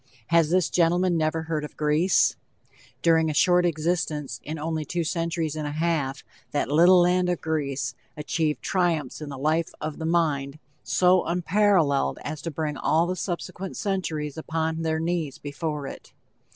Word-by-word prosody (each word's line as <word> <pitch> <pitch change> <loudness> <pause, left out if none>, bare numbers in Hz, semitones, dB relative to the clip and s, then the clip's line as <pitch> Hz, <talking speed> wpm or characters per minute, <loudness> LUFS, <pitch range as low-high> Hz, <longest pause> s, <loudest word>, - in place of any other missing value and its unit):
Has 170 -2 +4
this 180 0 +2
gentleman 175 +1 +2
never 160 0 0
heard 160 -2 -2
of 150 - -8
Greece? 155 +5 +3 0.7
During 160 -1 +4
a 150 - -3
short 180 +3 +4
existence, 155 -5 -2
in 155 +2 -5
only 160 0 -2
two 170 +3 -2
centuries 165 -1 -2
and 155 -1 -3
a 145 - -4
half, 155 -4 -1 0.3
that 145 - -1
little 175 +4 +6
land 180 0 +2
of 175 - 0
Greece 140 -5 -2 0.2
achieved 150 0 -1
triumphs 165 -8 0
in 150 - -6
the 140 - -6
life 155 +4 +1
of 155 -1 -5
the 160 - -2
mind 150 -4 0 0.3
so 180 0 +3
unparalleled 175 -4 +2
as 155 0 -5
to 170 - -4
bring 150 -1 -3
all 165 +2 +2
the 180 +1 -2
subsequent 185 +1 -5
centuries 165 - -2
upon 160 0 -2
their 160 -1 0
knees 165 -3 -2
before 145 0 -4
it. - - -9
160 Hz, 165 wpm, -25 LUFS, 150-175 Hz, 0.7 s, little